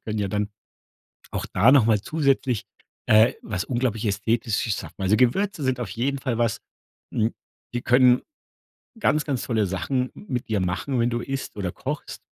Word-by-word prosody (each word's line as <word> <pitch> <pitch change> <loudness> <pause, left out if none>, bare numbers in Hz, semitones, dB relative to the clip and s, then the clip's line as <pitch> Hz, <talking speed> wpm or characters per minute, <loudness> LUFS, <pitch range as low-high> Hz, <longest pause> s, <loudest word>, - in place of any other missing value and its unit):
können 110 -1 -3
ja 100 -1 0
dann 105 +1 -1 0.8
auch - - -3
da 115 +8 +4
noch 135 -6 +6
mal 110 -2 +3
zusätzlich, 135 -4 +1 0.4
äh, 110 +3 +6
was 100 -4 -3
unglaublich 120 -3 -1
Ästhetisches 110 +1 0
schaffen. - - -10
Also 95 +3 +3
Gewürze 155 +8 +2
sind 130 -1 0
auf 115 -6 -3
jeden 130 +7 -1
Fall 125 -4 -2
was, 115 -3 0 0.5
hm, 110 +1 +1 0.4
die 120 - -1
können 125 0 +5 0.8
ganz, 150 -8 +2
ganz 135 -5 -2
tolle 110 -5 +1
Sachen 125 +8 -1
mit 125 - -5
dir 105 -2 0
machen, 95 +9 -1
wenn 120 +1 +2
du 120 0 -1
isst 135 -4 -5
oder 90 -4 -3
kochst - - -5
120 Hz, 170 wpm, -24 LUFS, 105-130 Hz, 0.8 s, noch